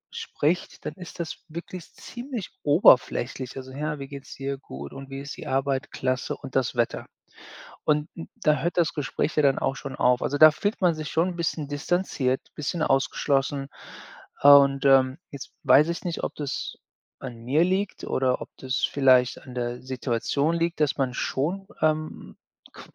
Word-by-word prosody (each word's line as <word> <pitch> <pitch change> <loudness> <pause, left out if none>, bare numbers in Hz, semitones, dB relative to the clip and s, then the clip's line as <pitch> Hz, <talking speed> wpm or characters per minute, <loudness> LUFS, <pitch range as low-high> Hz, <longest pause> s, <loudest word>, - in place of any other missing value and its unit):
spricht, 165 +5 -2
dann 150 - -3
ist 180 -1 -11
das 165 - -4
wirklich 170 +1 -8
ziemlich 240 - -7
oberflächlich: 135 -4 +3
„Also, 130 0 -8
ja, 150 +2 -3
wie 135 - -6
geht's 140 -1 -9
dir?“ 135 0 -4
„Gut.“ 70 - -9
„Und 135 0 -9
wie 135 0 -6
ist 140 - -7
die - - -8
Arbeit?“ 135 0 -1
„Klasse.“ 130 0 -2
„Und 135 -3 -11
das 130 -1 +1
Wetter?” 120 -1 -1 0.8
Und 150 +1 +1
n 165 - -8
da 150 -3 +3
hört 175 +2 -2
das 165 -3 +2
Gespräch 145 +2 -2
ja 150 - +3
dann 135 -1 +3
auch 135 - 0
schon 135 -1 -7
auf 125 0 +3
also, 145 - -1
da 155 0 +10
fühlt 205 +6 -2
man 175 -3 +3
sich 155 -2 -5
schon 165 +3 +2
'n 175 - -6
bisschen 165 -3 -2
distanziert, 145 -3 -1
bisschen 155 +3 -3
ausgeschlossen 135 0 +1 0.7
und, 140 -1 +7
ähm, 135 0 +5
jetzt 140 -2 -9
weiß 140 +5 +6
ich 170 - -3
nicht, 170 - -3
ob - - -2
das 145 -3 -4 0.4
an 120 -3 -8
mir 145 +7 +3
liegt 190 +2 -1
oder 130 -1 0
ob - - -7
das 130 0 -2
vielleicht 130 -3 +3
an 125 - -10
der 120 0 -3
Situation 130 +4 -1
liegt, 170 0 -1
dass 145 - +2
man 130 -2 0
schon, 175 +11 -2
ähm, 155 0 -1 0.4
qu - - -12
140 Hz, 180 wpm, -25 LUFS, 130-160 Hz, 0.8 s, da